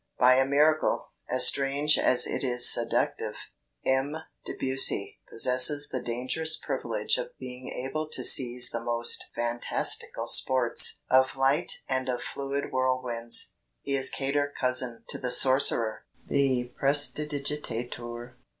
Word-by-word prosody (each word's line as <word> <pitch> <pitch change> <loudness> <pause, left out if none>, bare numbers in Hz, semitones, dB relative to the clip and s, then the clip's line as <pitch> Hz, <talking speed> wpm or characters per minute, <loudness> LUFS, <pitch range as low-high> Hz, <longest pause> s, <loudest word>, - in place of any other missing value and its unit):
By 130 +1 +4
a 135 0 +2
miracle, 150 +3 +1 0.2
as - - +2
strange 140 +2 +1
as 125 - +5
it - - -4
is 125 -2 +2
seductive, - - -2 0.5
M. 135 +3 0 0.3
Debussy 130 -6 0
possesses 130 +5 +4
the 130 - -4
dangerous 130 +7 -1
privilege - - -3
of - - -8
being 125 0 -9
able 145 +5 -5
to - - -3
seize 125 -1 +4
the 115 0 -5
most 120 0 +1
fantastical 120 0 -2
sports 130 -3 +3
of 130 0 +3
light 135 +2 0
and 130 -1 -3
of 125 -1 -3
fluid 140 0 -5
whirlwinds. 130 -3 -1 0.3
He 140 - -2
is 135 -1 +2
cater 145 +1 -2
cousin 125 -2 -1
to - - -5
the 125 - -3
sorcerer, 125 -3 +3 0.2
the 130 -3 -1
prestidigitateur...." 140 -5 -2
130 Hz, 125 wpm, -26 LUFS, 125-140 Hz, 0.5 s, as